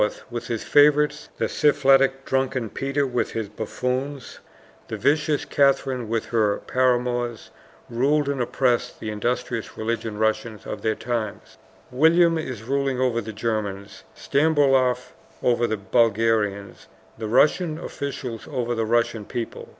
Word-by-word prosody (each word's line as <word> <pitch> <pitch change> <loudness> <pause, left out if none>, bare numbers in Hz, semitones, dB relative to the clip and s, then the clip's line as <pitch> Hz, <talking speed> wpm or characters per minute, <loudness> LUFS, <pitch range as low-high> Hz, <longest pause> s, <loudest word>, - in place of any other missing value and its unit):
with 120 0 -5
his 115 -2 -3
favorites, 150 0 +3
the - - 0
syphilitic 135 -2 +3
drunken 130 -4 -1
Peter 135 +1 -1
with 125 -2 -2
his 110 -2 -3
buffoons, 125 +5 -4 0.5
the 110 - -5
vicious 145 +6 +1
Catherine 135 -4 +1
with 115 -1 -1
her 110 -3 +1
paramours, 120 -2 0 0.4
ruled 140 +5 +1
and 140 -2 -1
oppressed 125 0 0
the 110 - -4
industrious 115 +1 -3
religious 115 0 -2
Russians 110 0 -1
of - - -6
their 110 -1 0
times. 115 -3 -4 0.4
William 165 +5 +4
is 130 -8 -6
ruling 135 +1 -1
over 125 -3 +1
the 110 0 -7
Germans, 100 -3 -4
Stambouloff 140 -4 +2 0.3
over 120 -1 +2
the 110 - -1
Bulgarians, 105 -1 0 0.3
the 110 - -3
Russian 155 - +3
officials 135 -7 -6
over 120 -1 -2
the 115 -1 -1
Russian 115 -1 +1
people. 115 +2 -6
120 Hz, 130 wpm, -24 LUFS, 110-135 Hz, 0.5 s, William